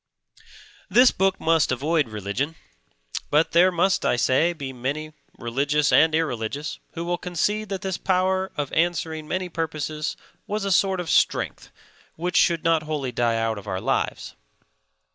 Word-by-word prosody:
This 245 +6 +6
book 190 0 +1
must 160 -4 +2
avoid 145 +1 +1
religion, 110 +9 -3 0.7
but 150 +2 +3
there 180 +2 +5
must 180 +2 +1
(I - - +2
say) 130 +7 +2
be 140 -6 -6
many, 145 +5 -4 0.2
religious 140 +5 0
and 160 +1 +5
irreligious, 145 -2 -2
who 170 - -4
will 175 0 -1
concede 205 +4 -1
that 195 -2 -4
this 190 -2 -2
power 190 0 +1
of 145 -2 -3
answering 160 -2 0
many 185 +2 -2
purposes 155 -2 -3 0.3
was 210 -1 -2
a 195 - 0
sort 190 0 +3
of 175 -3 -3
strength - - +1 0.5
which 175 +2 -3
should 170 -2 +3
not 165 -1 +3
wholly 150 -4 -3
die 115 -1 +1
out 115 -1 -1
of 100 - -14
our 95 -2 -2
lives. - - -2
160 Hz, 155 wpm, -24 LUFS, 140-180 Hz, 0.7 s, This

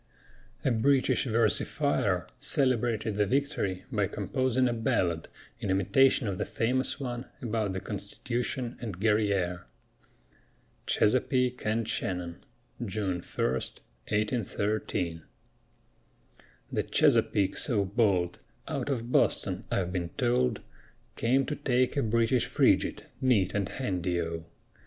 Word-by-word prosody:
A 135 - +3
British 130 +4 +2
versifier 115 -3 +1
celebrated 120 -5 +2
the 105 -1 +2
victory 115 -8 -1
by 105 -5 +1
composing 130 +5 0
a 120 - 0
ballad 90 -7 0 0.3
in 100 - -4
imitation 130 +6 +3
of 95 -3 -3
the - - +1
famous 125 +6 +1
one 125 -2 -4
about 110 -5 -2
the 95 - -2
Constitution 120 +5 -3
and 105 -7 -5
Guerrière. 100 -5 +1 1.2
CHESAPEAKE 125 +1 +1
AND 110 +1 0
SHANNON 90 -2 -2 0.4
[June 95 -4 -2
1, - - -3
1813] 100 - -2 1.5
The - - 0
Chesapeake 110 -4 +2
so 105 -5 +2
bold 95 -4 +1 0.3
Out - - -3
of 120 -3 -2
Boston, - - +2
I've 90 -2 -1
been 85 -2 -2
told, 60 +1 +1 0.5
Came 130 +4 +2
to 150 - -3
take 130 -2 +1
a 140 - +2
British 115 +2 +2
Frigate - - +2 0.2
Neat 115 -8 +2
and 100 -3 -1
handy 90 -7 -2
O! 85 -1 -4
110 Hz, 115 wpm, -29 LUFS, 95-125 Hz, 1.5 s, A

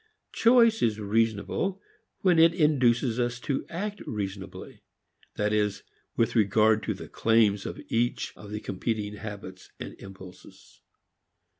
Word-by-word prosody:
Choice 230 -1 +5
is 110 -2 +1
reasonable 115 - 0 0.4
when 180 -4 +4
it 165 +1 +6
induces 125 -7 +2
us 120 0 -1
to 140 -1 -2
act 205 +4 -4
reasonably; 100 -2 -6 0.5
that 105 0 0
is, 105 -1 0 0.3
with 115 +1 +1
regard 110 0 +4
to 110 - -1
the - - -9
claims 110 -3 +2
of - - -6
each 120 +1 -1
of 105 - -12
the 105 +1 -5
competing 105 +1 -3
habits 100 -4 -9
and - - -7
impulses. 95 -1 -14
110 Hz, 130 wpm, -27 LUFS, 105-130 Hz, 0.5 s, it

